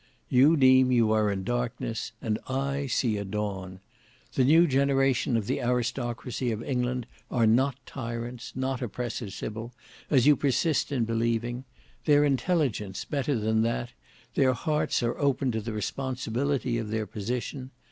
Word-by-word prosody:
You 140 +6 +5
deem 130 -1 +6
you 115 -3 +3
are 110 -1 +3
in 95 -1 -3
darkness, 120 -1 -2
and 110 -1 -1
I 140 +1 -1
see 120 -4 +1
a 100 - -3
dawn. 95 -2 -4 0.5
The 130 - +3
new 160 +6 +6
generation 135 -3 +2
of 110 - -2
the - - -1
aristocracy 125 0 -1
of 110 +1 -3
England 125 -2 -1 0.2
are 120 -3 +2
not 125 +4 +3
tyrants, 120 -1 -6
not 130 0 -2
oppressors, 120 -3 -4
Sybil, 110 +2 -5 0.4
as 130 -5 +4
you 150 0 +7
persist 145 +3 +1
in 125 -5 +1
believing. 115 +2 -1 0.4
Their 145 -1 +5
intelligence, 135 - 0
better 140 -2 -1
than 110 0 +1
that, 115 +1 -1 0.4
their 130 -1 +3
hearts 150 0 0
are 120 0 -1
open 140 -2 +1
to 110 -1 -2
the 115 +2 -5
responsibility 130 +2 -2
of 110 -2 -4
their 110 0 -1
position. 125 +5 -4
125 Hz, 150 wpm, -27 LUFS, 115-135 Hz, 0.5 s, you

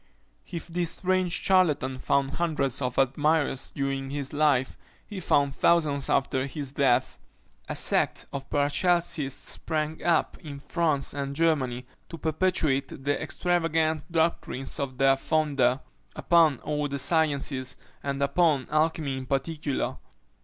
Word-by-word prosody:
If 170 -2 -5
this 175 -1 -2
strange 185 -1 0
charlatan 150 -9 +2
found 140 +1 +1
hundreds 145 -5 -1
of 125 -1 -2
admirers 140 +1 +1
during 135 -1 -3
his 140 0 -4
life, 145 -4 +2 0.3
he 205 -3 -7
found 140 -5 +2
thousands 150 -5 +2
after 135 0 +1
his 140 -1 -4
death. 135 -3 +1 0.5
A - - -3
sect - - +1
of 135 0 -6
Paracelsists 145 -1 0
sprang 155 -1 -2
up 170 -1 +1
in 145 -3 -8
France 155 -3 -1
and 140 0 -4
Germany, 135 -6 0 0.2
to 165 - -7
perpetuate 155 -4 0
the 145 +1 0
extravagant 165 -1 0
doctrines 160 -5 -1
of 135 -2 -3
their 135 0 +4
founder 135 -3 +1 0.3
upon 165 -5 +4
all 150 -1 -2
the 140 0 -4
sciences, 140 -4 +1 0.3
and 140 -1 -3
upon 145 -1 +2
alchymy 155 -3 0
in 130 -1 -7
particular. 145 +1 -2
145 Hz, 130 wpm, -27 LUFS, 135-160 Hz, 0.5 s, their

